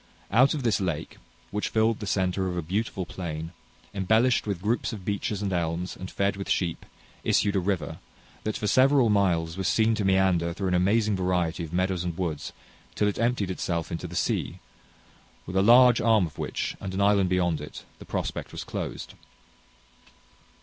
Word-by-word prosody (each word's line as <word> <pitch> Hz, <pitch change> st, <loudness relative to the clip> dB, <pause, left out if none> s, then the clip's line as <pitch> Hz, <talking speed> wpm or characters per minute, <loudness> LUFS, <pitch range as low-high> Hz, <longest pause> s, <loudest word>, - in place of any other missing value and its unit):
Out 130 Hz, +8 st, +5 dB
of 145 Hz, -, -4 dB
this 110 Hz, -4 st, +1 dB
lake, 80 Hz, -4 st, -3 dB, 0.3 s
which 105 Hz, 0 st, -2 dB
filled 110 Hz, 0 st, +2 dB
the 105 Hz, -, -5 dB
center 95 Hz, 0 st, 0 dB
of 90 Hz, -1 st, -3 dB
a 85 Hz, -, -2 dB
beautiful 95 Hz, +2 st, -2 dB
plain, 80 Hz, -2 st, -5 dB, 0.4 s
embellished 110 Hz, +5 st, +2 dB
with 95 Hz, -3 st, -3 dB
groups 115 Hz, +4 st, 0 dB
of 100 Hz, -5 st, -8 dB
beeches 105 Hz, 0 st, -2 dB
and 95 Hz, -2 st, -1 dB
elms, 85 Hz, +1 st, -2 dB
and 95 Hz, -, -7 dB
fed 100 Hz, 0 st, 0 dB
with 100 Hz, -, -6 dB
sheep, 85 Hz, -3 st, -1 dB, 0.4 s
issued 100 Hz, 0 st, +2 dB
a -, -, +3 dB
river, 95 Hz, -1 st, -2 dB, 0.4 s
that 110 Hz, -, -2 dB
for -, -, -4 dB
several 130 Hz, +1 st, +4 dB
miles 85 Hz, -5 st, +1 dB
was 95 Hz, -, -1 dB
seen 110 Hz, 0 st, +3 dB
to 110 Hz, -, -1 dB
meander 95 Hz, -3 st, +2 dB
through 95 Hz, +1 st, -2 dB
an -, -, 0 dB
amazing 105 Hz, +4 st, +2 dB
variety 90 Hz, -2 st, 0 dB
of 80 Hz, -, -7 dB
meadows 90 Hz, 0 st, 0 dB
and 85 Hz, -2 st, -4 dB
woods 80 Hz, -4 st, -3 dB, 0.4 s
till 105 Hz, -, +2 dB
it 105 Hz, -, -2 dB
emptied 115 Hz, -5 st, 0 dB
itself 85 Hz, -3 st, -3 dB
into 85 Hz, -, -4 dB
the -, -, -9 dB
sea, -, -, -1 dB, 0.9 s
with 90 Hz, -, -7 dB
a 95 Hz, -, +4 dB
large 120 Hz, +3 st, +7 dB
arm 110 Hz, -5 st, +4 dB
of 80 Hz, -, -10 dB
which, -, -, -3 dB
and 95 Hz, -1 st, -5 dB
an 100 Hz, -, 0 dB
island 100 Hz, -2 st, +3 dB
beyond 90 Hz, -4 st, +1 dB
it, 75 Hz, -, -9 dB, 0.2 s
the -, -, -11 dB
prospect -, -, -4 dB
was -, -, -6 dB
closed. -, -, -5 dB
95 Hz, 185 wpm, -26 LUFS, 90-105 Hz, 0.9 s, large